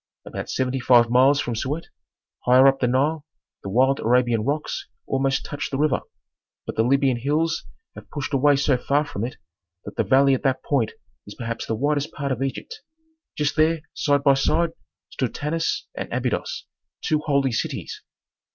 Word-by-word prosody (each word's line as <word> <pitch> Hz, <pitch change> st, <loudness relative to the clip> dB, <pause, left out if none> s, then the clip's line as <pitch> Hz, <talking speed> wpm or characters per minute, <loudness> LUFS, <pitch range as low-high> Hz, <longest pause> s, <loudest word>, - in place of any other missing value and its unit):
About -, -, -6 dB
seventy 130 Hz, 0 st, -1 dB
five 120 Hz, -2 st, +5 dB
miles 135 Hz, +3 st, +5 dB
from 120 Hz, -, -2 dB
Siut, 140 Hz, +8 st, -3 dB, 0.6 s
higher 125 Hz, +2 st, +6 dB
up 135 Hz, 0 st, +3 dB
the 125 Hz, -, +2 dB
Nile, 145 Hz, +5 st, +1 dB, 0.4 s
the 100 Hz, -, -6 dB
wild 130 Hz, +6 st, +3 dB
Arabian 120 Hz, -1 st, +2 dB
rocks 145 Hz, +5 st, -2 dB, 0.2 s
almost 135 Hz, 0 st, 0 dB
touch 145 Hz, -1 st, -4 dB
the 135 Hz, -, -3 dB
river, 150 Hz, -1 st, +1 dB, 0.6 s
but -, -, -5 dB
the -, -, +2 dB
Libyan 135 Hz, +1 st, +2 dB
hills 155 Hz, +6 st, 0 dB, 0.3 s
have -, -, -13 dB
pushed 145 Hz, 0 st, -5 dB
away 145 Hz, +1 st, +4 dB
so 140 Hz, -1 st, +2 dB
far 145 Hz, +4 st, +1 dB
from 105 Hz, -6 st, -5 dB
it 125 Hz, -, -4 dB, 0.5 s
that -, -, -9 dB
the -, -, +2 dB
valley 135 Hz, +1 st, +4 dB
at 130 Hz, -, 0 dB
that 135 Hz, -1 st, 0 dB
point 125 Hz, -7 st, 0 dB, 0.3 s
is 105 Hz, -, -9 dB
perhaps 115 Hz, -1 st, -5 dB
the 110 Hz, -, -1 dB
widest 145 Hz, +4 st, 0 dB
part 140 Hz, -2 st, -3 dB
of 130 Hz, -1 st, -2 dB
Egypt. 440 Hz, -, -4 dB, 0.6 s
Just 150 Hz, -1 st, 0 dB
there, 160 Hz, +1 st, +2 dB
side 145 Hz, -1 st, +1 dB
by 140 Hz, -1 st, +6 dB
side, 160 Hz, +5 st, +1 dB, 0.4 s
stood 125 Hz, -4 st, -3 dB
Tanis 165 Hz, +3 st, -1 dB
and -, -, -6 dB
Abydos, -, -, -2 dB, 0.4 s
two 155 Hz, -, +1 dB
holy 140 Hz, -3 st, +1 dB
cities. 110 Hz, -, -4 dB
135 Hz, 175 wpm, -23 LUFS, 125-145 Hz, 0.6 s, higher